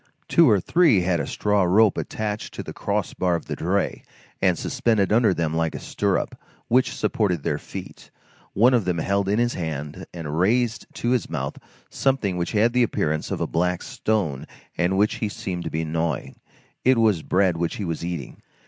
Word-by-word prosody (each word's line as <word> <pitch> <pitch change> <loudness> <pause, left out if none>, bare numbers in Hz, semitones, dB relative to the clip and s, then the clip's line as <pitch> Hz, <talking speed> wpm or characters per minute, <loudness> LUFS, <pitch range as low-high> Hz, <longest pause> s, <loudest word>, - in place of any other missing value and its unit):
Two 165 -5 +5
or 105 -3 +5
three 145 - +4
had 90 -1 +1
a - - -2
straw 105 -1 +1
rope 100 +4 +4
attached 105 -1 -4
to - - -5
the - - -8
cross - - -2
bar 90 -2 +1
of 85 - -4
the - - -4
dray, 95 +4 -1 0.4
and - - +3
suspended 105 -4 +1
under 115 -1 +4
them 85 -3 -1
like 80 -1 0
a - - -4
stirrup, - - -1 0.3
which 125 +2 +3
supported 90 -8 0
their - - -1
feet. - - -9 0.4
One 120 +6 +5
of 115 -6 +2
them 90 -2 0
held 100 +3 0
in 105 - +2
his 120 0 +1
hand 75 -4 -5
and 80 -2 -4
raised 115 +4 +1
to 120 - -1
his 125 -2 0
mouth 70 -4 -4 0.3
something 130 -9 0
which 85 +2 -2
had 110 +3 +3
the 125 - +3
appearance 80 -9 0
of - - -3
a - - +2
black 90 +1 0
stone 95 -12 -2 0.3
and 90 +2 +1
which 105 +2 +2
he 110 - -2
seemed 90 -3 -5
to - - -2
be 80 +1 -2
gnawing; 80 -3 -2 0.5
it 130 0 +4
was 110 -7 +3
bread 90 -1 +2
which 85 0 -1
he 105 - -4
was 85 -1 -3
eating. 85 -6 -5
95 Hz, 195 wpm, -24 LUFS, 85-110 Hz, 0.5 s, Two